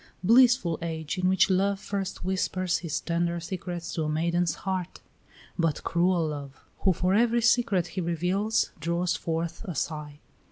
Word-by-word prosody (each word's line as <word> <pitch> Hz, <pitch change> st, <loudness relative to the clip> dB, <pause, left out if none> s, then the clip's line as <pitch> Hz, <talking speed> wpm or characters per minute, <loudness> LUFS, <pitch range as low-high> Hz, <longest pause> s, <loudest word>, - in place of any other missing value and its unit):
Blissful 235 Hz, -5 st, +5 dB
age 160 Hz, +1 st, -3 dB
in 185 Hz, 0 st, +2 dB
which 190 Hz, -1 st, +4 dB
Love 195 Hz, +1 st, +2 dB
first 195 Hz, -3 st, -4 dB
whispers 185 Hz, -1 st, 0 dB
his 165 Hz, -4 st, -3 dB
tender 170 Hz, 0 st, -1 dB
secrets 175 Hz, 0 st, -5 dB
to 160 Hz, -, -1 dB
a -, -, -1 dB
maiden's 170 Hz, +1 st, +1 dB
heart! 185 Hz, -2 st, -3 dB, 0.6 s
But 165 Hz, -3 st, 0 dB
cruel 170 Hz, -2 st, +1 dB
Love, 140 Hz, -2 st, -7 dB, 0.2 s
who 190 Hz, -, +3 dB
for 180 Hz, +2 st, +1 dB
every 235 Hz, +2 st, +3 dB
secret 235 Hz, -7 st, +3 dB
he 185 Hz, +1 st, -4 dB
reveals 180 Hz, +6 st, 0 dB
draws 170 Hz, +2 st, 0 dB
forth 165 Hz, +2 st, -3 dB
a 180 Hz, -7 st, -5 dB
sigh! 150 Hz, 0 st, -4 dB
175 Hz, 155 wpm, -27 LUFS, 165-190 Hz, 0.6 s, Blissful